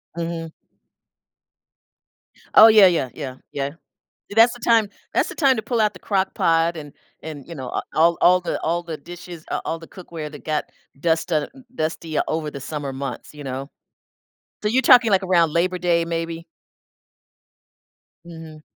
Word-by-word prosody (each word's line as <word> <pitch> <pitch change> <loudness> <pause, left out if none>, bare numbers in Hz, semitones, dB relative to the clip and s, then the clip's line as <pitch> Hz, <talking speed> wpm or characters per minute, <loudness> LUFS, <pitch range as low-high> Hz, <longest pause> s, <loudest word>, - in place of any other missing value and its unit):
Mhm. 165 -1 -4 2.0
Oh, 220 - +10
yeah, 215 -4 +8
yeah, 160 -8 +1
yeah, 135 -4 -6 0.2
yeah. 140 0 -3 0.6
See, 205 - -9
that's 230 +1 +7
the 245 - -13
time 225 -2 +3 0.2
that's - - +1
the - - -7
time 270 -5 +3
to 220 - -3
pull 235 0 -1
out 210 -1 +3
the 185 - -13
Crock 190 0 -1
Pot 165 +1 +2
and 145 -2 -9 0.3
and, 150 -3 -8
you 170 - -7
know 130 -4 -6
a - - -2
all 170 +2 +4
all 180 +1 +5
the - - -3
all 170 +2 0
the 165 -2 -6
dishes, 175 +1 -11
uh, - - -1
all 165 - -3
the 165 - -12
cookware 165 -4 -8
that 150 -2 -12
got 155 -1 -1 0.4
dust 165 +2 0
on 155 -2 +1 0.3
dusty 160 -3 -3
over 155 -1 -2
the 140 - -8
summer 145 0 -5
months, 135 +2 -6
you 150 - -9
know. 135 +2 -5 0.9
So 210 - +1
you're 255 +5 +2
talking. 240 -2 +6
like, 195 -1 +3
around 170 -4 +3
Labor 180 +2 +1
Day 170 -1 +1
maybe? 165 0 -4 1.8
Mhm. 160 -2 -11
165 Hz, 175 wpm, -22 LUFS, 155-185 Hz, 2.0 s, Oh